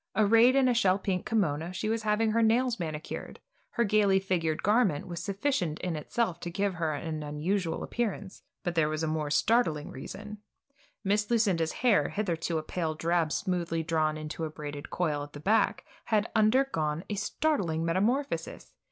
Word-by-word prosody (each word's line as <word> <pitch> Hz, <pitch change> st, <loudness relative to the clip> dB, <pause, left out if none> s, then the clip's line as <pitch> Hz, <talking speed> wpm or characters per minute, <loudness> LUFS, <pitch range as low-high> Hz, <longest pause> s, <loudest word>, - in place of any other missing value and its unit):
Arrayed 225 Hz, +4 st, +5 dB
in 270 Hz, -1 st, +4 dB
a 250 Hz, -, +3 dB
shell 195 Hz, -5 st, +3 dB
pink 190 Hz, -2 st, -2 dB
kimono, 170 Hz, -6 st, 0 dB
she 185 Hz, +3 st, -3 dB
was 225 Hz, +1 st, 0 dB
having 215 Hz, +1 st, +1 dB
her 230 Hz, +1 st, +2 dB
nails 235 Hz, +1 st, +2 dB
manicured. 155 Hz, -2 st, -5 dB, 0.3 s
Her 235 Hz, -, 0 dB
gaily 205 Hz, -2 st, +3 dB
figured 170 Hz, -5 st, -1 dB
garment 205 Hz, -8 st, +2 dB
was 170 Hz, -1 st, -5 dB
sufficient 195 Hz, -, -1 dB
in 180 Hz, -3 st, -2 dB
itself 180 Hz, +5 st, -1 dB
to 175 Hz, -, -5 dB
give 195 Hz, +3 st, -1 dB
her 160 Hz, -3 st, -1 dB
an 155 Hz, +1 st, -4 dB
unusual 160 Hz, +5 st, -2 dB
appearance; 205 Hz, -5 st, -3 dB, 0.2 s
but 175 Hz, -, -1 dB
there 160 Hz, -2 st, +2 dB
was 155 Hz, +1 st, -2 dB
a -, -, 0 dB
more 155 Hz, -1 st, -1 dB
startling 160 Hz, -2 st, +2 dB
reason. 210 Hz, +10 st, -8 dB, 0.6 s
Miss 205 Hz, +1 st, +1 dB
Lucinda's 195 Hz, -9 st, +2 dB
hair, 240 Hz, -5 st, +4 dB
hitherto 170 Hz, -5 st, -1 dB
a 155 Hz, -, -2 dB
pale 160 Hz, -1 st, -2 dB
drab 165 Hz, 0 st, +1 dB
smoothly 170 Hz, -3 st, -1 dB
drawn 155 Hz, -1 st, 0 dB
into 155 Hz, +1 st, -5 dB
a 160 Hz, -, -2 dB
braided 145 Hz, -2 st, -7 dB
coil 155 Hz, -5 st, -1 dB
at 145 Hz, 0 st, -8 dB
the 145 Hz, -, -8 dB
back, 210 Hz, +2 st, +1 dB, 0.2 s
had 215 Hz, 0 st, +1 dB
undergone 215 Hz, -, +2 dB
a -, -, -3 dB
startling 195 Hz, -, 0 dB
metamorphosis. 225 Hz, +12 st, -1 dB
180 Hz, 170 wpm, -29 LUFS, 160-215 Hz, 0.6 s, Arrayed